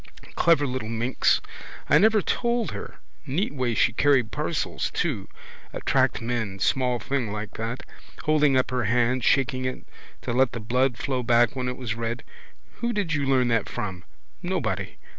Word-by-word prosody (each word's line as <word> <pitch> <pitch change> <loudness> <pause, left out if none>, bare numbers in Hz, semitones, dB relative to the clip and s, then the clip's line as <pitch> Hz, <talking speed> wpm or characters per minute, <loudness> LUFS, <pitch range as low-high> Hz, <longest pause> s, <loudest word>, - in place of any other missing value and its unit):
Clever 165 -4 +3
little 130 -4 -3
minx. 115 +3 +1 0.5
I 150 - +6
never 215 +1 +4
told 235 -2 0
her. - - -7 0.3
Neat 160 +9 -1
way 125 -4 -1
she 115 - +3
carries 135 0 +3
parcels 150 +1 -2
too. 130 - -2 0.5
Attract 115 - +1
men, 115 -5 -2
small 125 +4 +1
thing 120 -1 -2
like 105 -1 -5
that. 115 +3 -4 0.4
Holding 150 -3 +3
up 130 - +1
her 125 -2 0
hand, 120 +3 +2
shaking 130 -1 +2
it, 130 - -4 0.4
to - - -2
let 130 0 +3
the 115 - -4
blood 125 +3 +1
flow 130 -2 -1
back 120 +3 +3
when 125 -1 -2
it 125 0 -3
was 120 -4 -3
red. 115 +1 -4 0.5
Who 235 0 -1
did 200 -6 -1
you 140 -2 0
learn 130 -2 +3
that 115 -1 +1
from? 95 -3 -5 0.4
Nobody. - - -2
125 Hz, 165 wpm, -25 LUFS, 115-140 Hz, 0.5 s, I